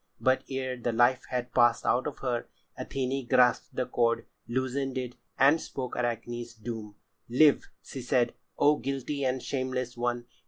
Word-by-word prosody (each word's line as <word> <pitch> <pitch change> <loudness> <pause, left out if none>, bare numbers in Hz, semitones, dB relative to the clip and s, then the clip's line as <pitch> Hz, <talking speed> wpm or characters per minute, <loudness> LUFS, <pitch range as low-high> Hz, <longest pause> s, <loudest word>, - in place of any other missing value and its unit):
But 130 0 +2
ere 130 -1 -3
the 120 0 -1
life 120 +3 +3
had 125 -1 -3
passed 120 -1 +4
out 125 +3 +2
of 150 - -5
her, 120 -2 -1 0.3
Athené 135 -1 -3
grasped 125 -1 +3
the 130 - 0
cord, 115 -2 +1 0.2
loosened 130 +2 -1
it, 125 -1 -3 0.2
and 145 +4 +5
spoke 130 -2 -5
Arachne's 120 0 -3
doom: 110 -2 -7 0.3
"Live!" 145 +4 +4
she 135 - -7
said, 120 0 +1 0.2
"O 145 +1 +5
guilty 140 +2 -3
and 130 -1 0
shameless 130 -2 -2
one! 120 0 -1
125 Hz, 155 wpm, -29 LUFS, 120-130 Hz, 0.3 s, and